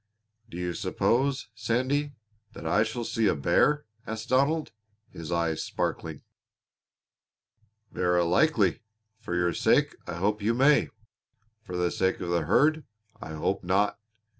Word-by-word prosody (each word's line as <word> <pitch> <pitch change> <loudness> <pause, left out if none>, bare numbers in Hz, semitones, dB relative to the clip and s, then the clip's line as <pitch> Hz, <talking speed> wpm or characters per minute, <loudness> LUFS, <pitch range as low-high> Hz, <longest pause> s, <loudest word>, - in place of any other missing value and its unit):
"Do 85 - -8
you 90 -1 -2
suppose, 130 +7 0
Sandy, 130 +6 -1 0.4
that - - -10
I 105 - +2
shall 110 +2 -2
see 115 -1 0
a - - +2
bear?" 150 - +2 0.2
asked 110 0 -5
Donald, 140 +5 +2 0.4
his 80 0 -8
eyes 85 -2 0
sparkling. - - -3 1.7
"Verra 90 -1 +1
likely. 100 - +2 0.4
For 95 -6 -4
your 90 -1 +1
sake - - +2
I 90 - -4
hope 105 +5 0
you 115 +3 +1
may; 140 +4 +4 0.7
for 90 -4 -6
the 90 -1 +1
sake 95 0 0
of 90 -1 -4
the 85 -3 +1
herd 155 - +3 0.4
I 80 - -7
hope 75 - -2
not. 100 +4 +1
105 Hz, 140 wpm, -27 LUFS, 90-130 Hz, 1.7 s, may